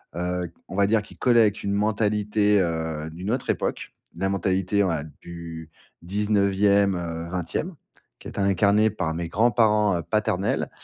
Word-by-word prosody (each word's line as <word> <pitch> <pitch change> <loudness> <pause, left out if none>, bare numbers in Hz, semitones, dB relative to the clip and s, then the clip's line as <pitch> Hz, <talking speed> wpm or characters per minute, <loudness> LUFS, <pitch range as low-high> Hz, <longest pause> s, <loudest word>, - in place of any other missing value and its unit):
heu, 90 0 -2 0.2
on - - -8
va 100 0 +3
dire, 110 +2 +2
qui 105 - -15
collait 120 -2 +4
avec 105 -1 +1
une 100 0 -1
mentalité, 105 0 +1
heu, 80 -2 -2
d'une 90 +6 -5
autre 125 +1 -2
époque. - - -2 0.2
La 95 +3 -1
mentalité, 95 +1 +1
ouais, 80 -6 -1 0.2
du 85 -2 -9 0.3
19ème, 100 0 +2
heu, 85 -1 -5
20ème, 90 - -3 0.5
qui - - -10
était - - -7
incarnée 100 +2 +3
par 80 -6 -3
mes 85 0 -3
grands-parents 105 -1 +3
heu, 85 - -4
paternels 100 -1 0
100 Hz, 155 wpm, -24 LUFS, 85-105 Hz, 0.5 s, collait